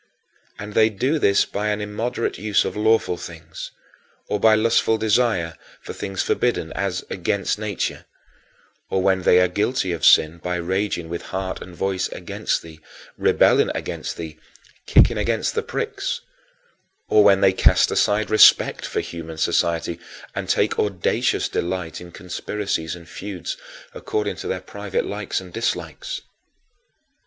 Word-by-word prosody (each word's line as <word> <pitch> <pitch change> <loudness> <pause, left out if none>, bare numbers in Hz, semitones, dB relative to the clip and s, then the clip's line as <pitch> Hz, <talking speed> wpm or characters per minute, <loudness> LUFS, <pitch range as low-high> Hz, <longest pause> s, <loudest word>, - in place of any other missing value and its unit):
And 105 +1 -7
they 110 +1 +5
do 130 +9 0
this 100 -7 +4
by 105 +1 -3
an 105 0 0
immoderate 105 +3 -3
use 105 0 +2
of - - -3
lawful 110 -4 +2
things; 80 -2 -9 0.6
or 105 - -1
by 110 +1 +6
lustful 110 0 +3
desire 110 -7 +1 0.2
for - - -8
things 95 -2 -3
forbidden, 120 -9 0
as 95 -2 -2
"against 100 +3 -1
nature"; 105 -1 -3 0.8
or 95 - 0
when 95 -1 +3
they 90 0 +5
are 90 - +4
guilty 105 +2 0
of 85 -4 -4
sin 80 +2 +5
by 90 +1 -3
raging 90 0 -1
with 85 +1 -4
heart 95 0 -4
and 90 - -10
voice 95 0 -1
against - - -3
thee, 80 -1 -12 0.4
rebelling - - +4
against - - -4
thee, 80 -2 -7 0.5
"kicking - - +5
against 115 -1 0
the 450 - 0
pricks"; 445 -3 -3 0.9
or 105 - +5
when 100 -1 +5
they 95 -1 +5
cast - - +4
aside 105 +1 +1
respect 110 - +6
for - - -1
human 80 -1 -8
society 85 +1 0 0.3
and - - -4
take - - +1
audacious 100 -4 +1
delight 90 -2 -3
in 90 -1 -11
conspiracies 90 -2 -4
and 85 -2 -13
feuds 100 - -6 0.4
according 425 +2 -2
to - - -7
their - - -2
private 480 0 -3
likes - - -3
and - - -12
dislikes. - - -3
100 Hz, 145 wpm, -22 LUFS, 85-110 Hz, 0.9 s, by